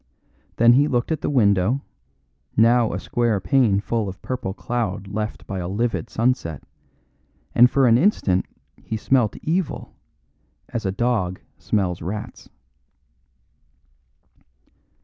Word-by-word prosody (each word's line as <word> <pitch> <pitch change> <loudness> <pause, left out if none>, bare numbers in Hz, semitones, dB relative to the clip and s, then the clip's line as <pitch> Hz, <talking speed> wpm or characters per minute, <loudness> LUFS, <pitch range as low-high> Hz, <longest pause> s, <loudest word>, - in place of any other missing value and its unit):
Then 120 +1 +6
he 140 +4 +4
looked 125 +1 -1
at 160 - -1
the - - -1
window, 110 -1 +2 0.7
now 115 +1 +4
a - - -3
square 115 -4 0
pane 110 -1 +2
full 110 -1 -2
of 95 - -9
purple 125 -7 -3
cloud 105 -2 -3
cleft 105 +1 -4
by 95 -2 -4
livid 115 +5 -2
sunset, 115 - -1 0.9
and 125 +1 +7
for 135 +1 +3
an 120 -1 +5
instant 100 - +2 0.3
he 110 - -4
smelt 120 -1 +1
evil 170 0 -2 0.8
as 115 -4 -3
a - - 0
dog 100 -4 -1 0.2
smells 90 -4 -1
rats. 100 +6 -6
115 Hz, 120 wpm, -22 LUFS, 100-125 Hz, 0.9 s, and